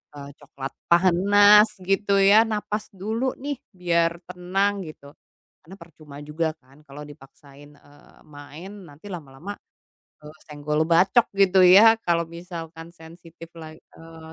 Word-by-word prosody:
eee, 140 Hz, 0 st, -10 dB
coklat 135 Hz, -2 st, -9 dB, 0.2 s
panas 205 Hz, +4 st, +4 dB, 0.2 s
gitu 195 Hz, +2 st, 0 dB
ya 200 Hz, +3 st, +4 dB
napas 210 Hz, -1 st, -4 dB
dulu 225 Hz, +7 st, -3 dB
nih 285 Hz, -2 st, -5 dB, 0.2 s
biar 170 Hz, -1 st, -1 dB
tenang 185 Hz, +1 st, -3 dB
gitu, 140 Hz, -2 st, -14 dB, 0.6 s
karena 190 Hz, -, -12 dB
percuma 160 Hz, -5 st, -16 dB
juga 155 Hz, +1 st, -4 dB
kan 135 Hz, 0 st, -25 dB
kalau 145 Hz, +2 st, -11 dB
dipaksain, 145 Hz, 0 st, -17 dB
eee, 145 Hz, 0 st, -23 dB
main 150 Hz, +5 st, -13 dB, 0.2 s
nanti 150 Hz, +7 st, -15 dB
lama-lama, 165 Hz, +4 st, -9 dB, 0.7 s
eee, 150 Hz, +1 st, -13 dB
senggol 150 Hz, +1 st, -3 dB
bacok 190 Hz, +8 st, +3 dB
gitu 190 Hz, -1 st, +3 dB
ya 220 Hz, +5 st, +6 dB
kalau 170 Hz, -1 st, 0 dB
misalkan 170 Hz, -1 st, -10 dB
sensitif 165 Hz, 0 st, -15 dB
la 155 Hz, -1 st, -11 dB
eee, 160 Hz, 0 st, -16 dB
170 Hz, 130 wpm, -22 LUFS, 150-195 Hz, 0.7 s, ya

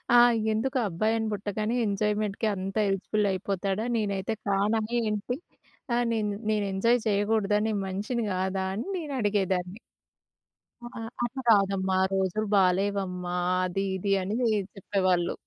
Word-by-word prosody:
ఆ! -, -, +9 dB, 0.3 s
ఎందుకు 255 Hz, +5 st, 0 dB
అబ్బాయిని 220 Hz, +5 st, 0 dB
పుట్టగానే 210 Hz, +3 st, -2 dB
ఎంజాయ్‌మెంట్‌కి 210 Hz, +1 st, 0 dB
అంత 190 Hz, +2 st, -5 dB
హెల్ప్‌ఫుల్ 200 Hz, +2 st, 0 dB
అయిపోతాడా? 195 Hz, +2 st, -2 dB
నేనైతే 200 Hz, -1 st, -1 dB
కానా 205 Hz, +3 st, +2 dB, 0.2 s
ఏంటి? 215 Hz, +3 st, -2 dB, 0.6 s
ఆహ్, 240 Hz, 0 st, +2 dB
నేను, 210 Hz, -2 st, 0 dB, 0.2 s
నేను 210 Hz, -2 st, +1 dB
ఎంజాయ్ 230 Hz, +5 st, +3 dB
చేయకూడదా 210 Hz, 0 st, +2 dB
నేను 210 Hz, -2 st, 0 dB
మనిషిని 210 Hz, +5 st, -2 dB
కాదా? 190 Hz, +1 st, -1 dB
అని 230 Hz, -, -4 dB
నేనడిగేదాన్ని. 205 Hz, -, -1 dB, 1.1 s
అహా! 235 Hz, -, -9 dB, 0.2 s
అది 260 Hz, +3 st, -3 dB
కాదమ్మా! 195 Hz, -3 st, +3 dB, 0.2 s
రోజులు 195 Hz, +3 st, 0 dB
బాలేవమ్మా, 185 Hz, -1 st, +1 dB, 0.3 s
అది 195 Hz, +2 st, -1 dB
ఇది 195 Hz, +2 st, -2 dB
అని 200 Hz, +4 st, -2 dB
ది 240 Hz, -, +3 dB, 0.3 s
చెప్పేవాళ్ళు. 185 Hz, -3 st, +1 dB
200 Hz, 120 wpm, -27 LUFS, 190-220 Hz, 1.1 s, ఆ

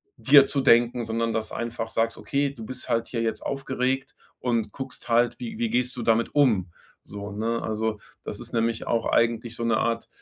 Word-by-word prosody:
dir 140 Hz, 0 st, +7 dB
zu 135 Hz, 0 st, 0 dB
denken, 120 Hz, 0 st, +4 dB
sondern 115 Hz, 0 st, -1 dB
das 110 Hz, -1 st, -2 dB
einfach 115 Hz, 0 st, -4 dB
sagst: 115 Hz, 0 st, 0 dB
Okay, 140 Hz, 0 st, -1 dB
du 120 Hz, -5 st, -10 dB
bist 130 Hz, +3 st, -6 dB
halt 115 Hz, 0 st, 0 dB
hier 115 Hz, -2 st, -2 dB
jetzt 115 Hz, -, -2 dB
aufgeregt 135 Hz, 0 st, -2 dB, 0.2 s
und 115 Hz, -4 st, -1 dB
guckst 135 Hz, -2 st, -7 dB
halt, 120 Hz, +1 st, +3 dB
wie 225 Hz, -3 st, -5 dB
wie 235 Hz, -, 0 dB
gehst 125 Hz, -, 0 dB
du -, -, -3 dB
damit, 115 Hz, +1 st, +2 dB, 0.7 s
so, 100 Hz, 0 st, -7 dB
ne? 115 Hz, +3 st, -1 dB
Also, 110 Hz, -1 st, -2 dB, 0.2 s
das -, -, -6 dB
ist -, -, -8 dB
nämlich 115 Hz, -1 st, 0 dB
auch 115 Hz, -, +1 dB
eigentlich 115 Hz, 0 st, +1 dB
so 120 Hz, -, -4 dB
'ne 115 Hz, -1 st, +3 dB
Art, 115 Hz, +1 st, -1 dB
115 Hz, 195 wpm, -25 LUFS, 115-130 Hz, 0.7 s, dir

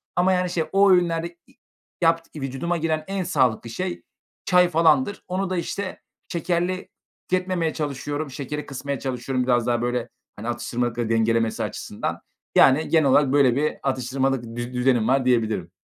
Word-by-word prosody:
ama, 185 Hz, +1 st, +3 dB
yani, 180 Hz, 0 st, +1 dB
şey, 170 Hz, -2 st, 0 dB
o 200 Hz, +1 st, +5 dB
öğünlerde 170 Hz, -1 st, +1 dB
i -, -, -23 dB, 0.5 s
yapt 165 Hz, 0 st, +2 dB
i 150 Hz, -, -6 dB
vücuduma 135 Hz, +6 st, -2 dB
giren 155 Hz, -1 st, -1 dB
en 195 Hz, -1 st, -2 dB
sağlıklı 130 Hz, -10 st, +1 dB
şey 180 Hz, +10 st, -4 dB, 0.4 s
çay 180 Hz, -1 st, +4 dB
falandır. 160 Hz, +2 st, +2 dB
Onu 185 Hz, +1 st, -2 dB
da 185 Hz, -, -1 dB
işte 185 Hz, +3 st, -4 dB, 0.3 s
şekerli 175 Hz, +2 st, -1 dB, 0.4 s
tüketmemeye 180 Hz, -3 st, 0 dB
çalışıyorum. 145 Hz, 0 st, -3 dB
Şekeri 145 Hz, +2 st, -5 dB
kısmaya 140 Hz, 0 st, -4 dB
çalışıyorum 130 Hz, 0 st, -2 dB
biraz 120 Hz, -2 st, +1 dB
daha 120 Hz, -1 st, +1 dB
böyle, 120 Hz, 0 st, -1 dB, 0.3 s
hani, 105 Hz, +3 st, -7 dB
atıştırmalıkları 120 Hz, -1 st, -2 dB
dengelemesi 115 Hz, 0 st, +1 dB
açısından. -, -, -4 dB, 0.3 s
Yani, 135 Hz, +4 st, +5 dB
genel 155 Hz, -4 st, +4 dB
olarak 140 Hz, 0 st, +4 dB
böyle 135 Hz, -4 st, +4 dB
bir 150 Hz, +2 st, 0 dB
atıştırmalık 130 Hz, -2 st, -1 dB
düz 120 Hz, +1 st, -4 dB
düzenim 125 Hz, -2 st, +2 dB
var 130 Hz, +1 st, +2 dB
diyebilirim. 110 Hz, -8 st, +1 dB
140 Hz, 155 wpm, -24 LUFS, 125-170 Hz, 0.5 s, o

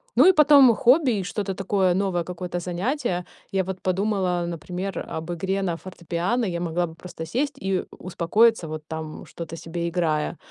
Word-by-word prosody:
Ну, -, -, +7 dB
и -, -, +9 dB
потом 290 Hz, -5 st, +7 dB
хобби 260 Hz, +3 st, +4 dB
и -, -, -4 dB
что-то 195 Hz, 0 st, -3 dB
такое 190 Hz, -2 st, +1 dB
новое, 185 Hz, -3 st, 0 dB
какое-то 180 Hz, 0 st, -5 dB
занятие. 180 Hz, -, -2 dB, 0.3 s
Я 190 Hz, -1 st, +1 dB
вот 185 Hz, 0 st, -6 dB
подумала, 185 Hz, -2 st, 0 dB
например, 180 Hz, +3 st, -4 dB
об 160 Hz, +2 st, -5 dB
игре 190 Hz, +3 st, -1 dB
на 175 Hz, -3 st, 0 dB
фортепиано. 180 Hz, +6 st, -2 dB
Я 170 Hz, -3 st, -2 dB
могла 175 Hz, +1 st, 0 dB
бы 160 Hz, -, -9 dB
просто 165 Hz, -1 st, -8 dB
сесть 270 Hz, -, -1 dB
и 195 Hz, -7 st, -1 dB
у -, -, -15 dB
успокоиться, 185 Hz, +3 st, +3 dB
вот 155 Hz, 0 st, -6 dB
там 160 Hz, -1 st, -6 dB
что-то 165 Hz, -1 st, -8 dB
себе 170 Hz, +1 st, -3 dB
играя. 165 Hz, -2 st, 0 dB
180 Hz, 175 wpm, -24 LUFS, 170-200 Hz, 0.3 s, и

